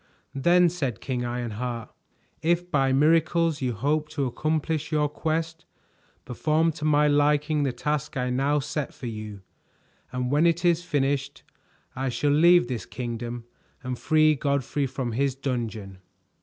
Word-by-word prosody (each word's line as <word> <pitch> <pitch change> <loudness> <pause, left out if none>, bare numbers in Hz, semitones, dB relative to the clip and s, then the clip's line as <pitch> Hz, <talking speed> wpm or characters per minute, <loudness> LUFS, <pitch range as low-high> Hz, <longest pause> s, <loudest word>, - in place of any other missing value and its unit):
"Then," 175 +6 +4
said 140 - -3
King 125 -2 -3
Ironheart, 120 -1 -4 0.5
"if 175 +2 0
by 135 -3 +2
miracles 160 +2 +2
you 125 -2 0
hope 150 +7 -1
to 145 -4 -2
accomplish 155 +4 -2
your 150 -1 +2
quest, 160 +2 -3 0.6
perform 155 +6 +1
to 150 -1 -6
my 150 -1 +4
liking 150 +1 +2
the 140 -2 +1
task 150 +3 -3
I 125 -1 -1
now 140 +4 +1
set 150 0 -3
for - - -9
you, 110 -3 -6 0.7
and 125 0 -2
when 150 +4 +4
it 170 +1 +1
is 170 0 +3
finished 140 -3 -1 0.5
I 130 0 -2
shall 145 +4 0
leave 170 +3 +6
this 120 -6 -4
kingdom 120 0 -5 0.4
and 130 0 -3
free 155 +3 +3
Godfrey 140 -1 -1
from 130 -2 -4
his 135 +3 0
dungeon." 115 -8 -4
145 Hz, 145 wpm, -26 LUFS, 125-155 Hz, 0.7 s, leave